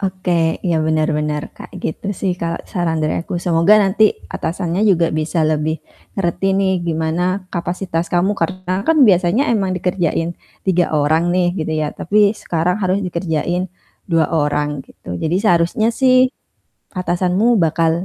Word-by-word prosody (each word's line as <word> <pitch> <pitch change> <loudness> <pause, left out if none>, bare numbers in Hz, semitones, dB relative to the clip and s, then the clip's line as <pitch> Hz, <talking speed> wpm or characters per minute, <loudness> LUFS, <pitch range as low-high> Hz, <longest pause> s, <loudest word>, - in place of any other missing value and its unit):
Oke, 180 -4 0
ya 170 -3 +1
bener 155 -1 +1
bener 150 -1 -2
kayak - - -11
gitu 160 - -4
sih 190 -2 +1
kalo 170 0 -2 0.2
saran 175 -4 0
dari - - 0
aku. 175 - -5
Semoga 170 +3 +4
nanti 205 +3 +3 0.3
atasannya 175 +2 -2
juga 175 -3 +3
bisa 155 +2 -2
lebih 155 0 0 0.4
ngerti 195 +1 0
nih 195 -1 +2
gimana 160 +1 -1 0.3
kapasitas 175 -1 -3
kamu 180 +3 +2
karena 185 0 -2
kan 325 - +4
biasanya 185 +5 +3
emang 200 -4 0
dikerjain 175 -2 -1 0.3
3 180 -2 +2
orang 155 +3 +2
nih 180 -1 +2
gitu 160 0 -2
ya, 155 - 0
tapi 205 +3 +2
sekarang 180 -3 -1
harus 185 0 +1
dikerjain 175 +1 -2 0.4
2 165 -2 +3
orang 150 -2 0
gitu, - - -18
jadi 165 +3 +1
seharusnya 175 +2 +2
sih 255 0 +4 0.7
atasanmu 180 +3 0 0.2
bakal 165 0 +2
175 Hz, 145 wpm, -18 LUFS, 160-190 Hz, 0.7 s, Semoga